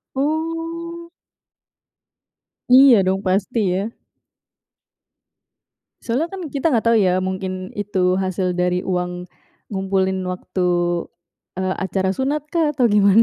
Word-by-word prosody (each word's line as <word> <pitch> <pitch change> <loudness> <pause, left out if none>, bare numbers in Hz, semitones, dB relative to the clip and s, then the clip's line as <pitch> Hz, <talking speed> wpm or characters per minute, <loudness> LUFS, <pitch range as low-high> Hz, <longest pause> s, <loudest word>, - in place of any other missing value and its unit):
Oh. 330 +3 -3 1.6
Iya, 255 -4 +8
dong. 190 +1 +1
Pasti, 195 +5 0
ya. 195 +4 -1 2.1
Soalnya, 275 +9 -1
kan, 375 -4 -6
kita 290 +3 -1
enggak 230 -3 +1
tahu, 230 - +4
ya, 185 0 +2
mungkin 185 0 -4
itu 190 -3 0
hasil 185 -1 -1
dari 180 0 0
uang 180 -1 -2 0.4
ngumpulin 190 -1 -1
waktu, 180 0 -2 0.9
eee, 185 0 -1
acara 190 0 -1
sunat, 285 +3 -2
kah, 320 -3 +2
atau 255 -4 +2
gimana? 205 0 +5
195 Hz, 110 wpm, -20 LUFS, 185-275 Hz, 2.1 s, Iya